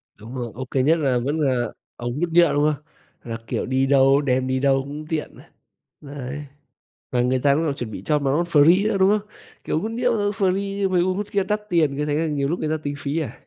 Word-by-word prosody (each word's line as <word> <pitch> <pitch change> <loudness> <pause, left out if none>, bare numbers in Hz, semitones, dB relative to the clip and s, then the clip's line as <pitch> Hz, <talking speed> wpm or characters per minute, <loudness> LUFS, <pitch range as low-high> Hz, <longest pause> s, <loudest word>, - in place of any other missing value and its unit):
Đúng 115 +5 -10
rồi, 120 -3 -4
ô 130 +2 -5
kê 130 +1 0
nhất 160 +4 +3
là 135 -5 +1
vẫn 145 +6 -2
là 130 -5 +1 0.3
ống 120 +3 -4
hút 175 +1 0
nhựa, 170 -3 +5
đúng 145 0 +2
không? 145 0 -11 0.5
Là, 115 - -2
kiểu, - - -2
đi 130 +1 +1
đâu, 135 0 +4
đem 130 -2 0
đi 130 0 0
đâu 135 0 +3
cũng 145 +3 -7
tiện 160 -2 -3
ấy. - - -15 0.6
Đấy, 145 0 -7 0.7
và 125 - +1
người 125 +1 +2
ta 140 +2 +3
cũng 160 +3 0
còn 145 -3 0
chuẩn 120 -5 -5
bị - - -7
cho 150 -1 +2
mà 140 -2 -1
nó 150 +5 +2
free 170 +4 +4
nữa, 215 - 0
đúng 190 +1 +5
không? 210 0 -14 0.4
Kiểu, - - 0
hút 220 - -3
nhựa, 240 +1 0
ơ, 205 -1 0
free 195 0 -1
chứ 195 - +3
mấy 180 -2 +2
ống 185 +1 0
hút 205 +1 -3
kia 200 - +2
đắt 210 +2 -1
tiền 155 -6 +2
cứ 150 - -1
thế 145 - 0
là 160 +2 0
nhiều 145 -3 -1
lúc 170 +4 -1
người 155 - -1
ta 155 - 0
tính 145 -1 -3
phí 140 +3 -2
à. 155 - -5
145 Hz, 265 wpm, -23 LUFS, 135-175 Hz, 0.7 s, nhựa